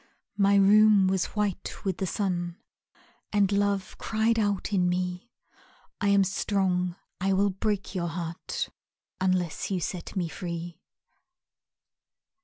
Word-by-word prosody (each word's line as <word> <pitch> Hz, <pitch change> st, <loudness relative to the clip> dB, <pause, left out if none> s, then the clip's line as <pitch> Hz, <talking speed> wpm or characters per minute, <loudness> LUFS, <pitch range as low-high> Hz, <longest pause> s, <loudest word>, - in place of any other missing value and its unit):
My 200 Hz, 0 st, +5 dB
room 205 Hz, 0 st, +6 dB
was 190 Hz, -1 st, +1 dB
white 205 Hz, -2 st, -2 dB
with 190 Hz, -2 st, -1 dB
the 190 Hz, -, -2 dB
sun 175 Hz, -3 st, -2 dB, 0.7 s
And 205 Hz, -2 st, +3 dB
Love 200 Hz, -1 st, 0 dB
cried 225 Hz, +1 st, +1 dB
out 205 Hz, -1 st, 0 dB
in 180 Hz, -2 st, +3 dB
me, 180 Hz, +4 st, -2 dB, 0.7 s
"I 200 Hz, -, +2 dB
am 200 Hz, -1 st, +5 dB
strong, 185 Hz, -2 st, 0 dB, 0.2 s
I 195 Hz, +1 st, +1 dB
will 200 Hz, +1 st, +3 dB
break 205 Hz, +1 st, -2 dB
your 175 Hz, -3 st, -1 dB
heart 170 Hz, 0 st, -4 dB, 0.5 s
Unless 185 Hz, -3 st, 0 dB
you 190 Hz, -2 st, 0 dB
set 175 Hz, +2 st, -5 dB
me 180 Hz, -3 st, 0 dB
free." 170 Hz, 0 st, -6 dB
190 Hz, 125 wpm, -27 LUFS, 180-200 Hz, 0.7 s, room